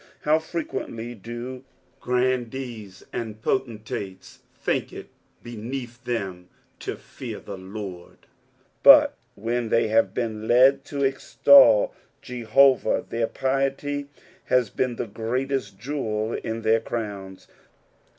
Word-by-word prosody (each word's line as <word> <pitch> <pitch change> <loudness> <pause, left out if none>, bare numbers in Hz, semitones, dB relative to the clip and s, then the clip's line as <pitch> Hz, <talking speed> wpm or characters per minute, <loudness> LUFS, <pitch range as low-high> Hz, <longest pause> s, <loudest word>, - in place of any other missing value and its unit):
How 155 +1 +3
frequently 120 -8 -5
do 120 +4 -7 0.4
grandees 125 -5 -2
and 110 -2 -5
potentates 110 -6 -4 0.2
think - - -1
it - - -9 0.3
beneath 120 +1 -7
them 95 -7 -4 0.3
to - - -5 0.2
(ear - - -5
the 100 - -8
Lord; 95 -2 -8 0.6
but, - - +8 0.2
when 115 +2 -2
they 115 -1 +2
have 110 -3 +2
been 110 -2 -3
li^ 135 +3 +5
to 140 -1 -3
extol 280 - +6 0.3
Jehovah, 125 +2 +3
their 115 -1 -1
piety 135 +2 -1 0.4
has 125 -4 +2
been 125 -2 -1
the - - -3
greatest 115 0 -3
jewel 110 -3 -2
in 115 0 -4
their 110 +1 +4
crowns. 100 -5 -6
120 Hz, 110 wpm, -25 LUFS, 110-130 Hz, 0.6 s, but